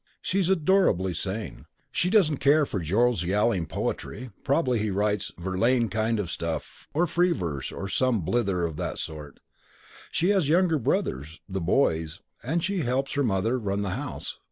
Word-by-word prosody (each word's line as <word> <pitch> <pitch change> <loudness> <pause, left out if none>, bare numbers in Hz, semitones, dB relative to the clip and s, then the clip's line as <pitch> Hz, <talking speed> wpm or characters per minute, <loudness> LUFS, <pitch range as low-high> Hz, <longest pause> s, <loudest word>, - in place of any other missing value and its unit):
She's 190 -1 0
adorably 165 - +3
sane. 100 +6 -5 0.3
She 180 - +1
doesn't 180 -8 +4
care 145 +2 +4
for 100 - -3
Joe's 105 +5 +2
yowling 95 -1 +1
poetry 120 +8 -4
(probably 135 -4 +2
he 105 0 -1
writes 105 +1 0
Verlaine 110 +7 +1
kind 110 0 0
of 90 -4 -3
stuff, 85 -1 -5
or 165 +5 +2
free 175 +2 +2
verse, 80 - -4
or 95 - -5
some 120 +1 +1
blither 95 -1 0
of 80 -2 -4
that - - -3
sort). 75 -3 -7 0.7
She 175 - +1
has 190 -8 +2
younger 170 -1 +3
brothers 80 - -1
['the 95 0 -3
boys') 80 - +1 0.2
and 160 +6 -1
she 195 0 0
helps 135 -1 -1
her 145 - +1
mother 115 +1 +1
run 100 -2 -1
the 100 - -2
house. - - -5
110 Hz, 165 wpm, -26 LUFS, 95-145 Hz, 0.7 s, doesn't